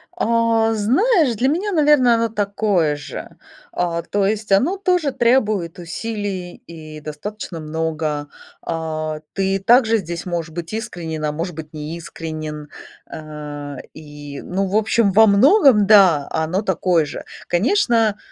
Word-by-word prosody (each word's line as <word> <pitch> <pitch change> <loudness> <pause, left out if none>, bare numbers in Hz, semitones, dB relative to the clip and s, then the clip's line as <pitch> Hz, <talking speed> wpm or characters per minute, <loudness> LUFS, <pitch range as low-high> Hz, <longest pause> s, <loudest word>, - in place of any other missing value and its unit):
А, 230 0 +2
знаешь, 270 - +2
для 255 +5 +1
меня, 370 +8 0
наверно, 295 -7 +4
оно 230 0 0
такое 200 -7 0
же. 145 -2 -8 0.4
А, 170 -1 -1
то 200 +3 -1
есть 215 0 -3
оно 280 - +3
тоже 360 -7 +1
требует 215 -9 +1
усилий 190 0 -5
и 155 -2 -10
достаточно 165 +4 -7
много. 155 -1 -3 0.3
А, 155 -1 -4
ты 195 0 0
также 230 +2 +4
здесь 170 -3 -5
можешь 170 -2 -3
быть 170 +2 -6
искренен, 165 -8 -5
а 150 - 0
может 165 +2 -5
быть 155 -1 -9
неискренен. 155 -1 -7 0.4
Э, 150 -2 -7 0.2
и, 145 -2 -10
ну, 195 +2 -2
в 195 - -3
общем, 220 -1 +2
во 220 +3 +6
многом, 250 - +5
да, 185 -9 +6
оно 160 +5 -1
такое 180 -4 +1
же. - - -7 0.2
Конечно, 225 - +2
185 Hz, 135 wpm, -20 LUFS, 155-225 Hz, 0.4 s, во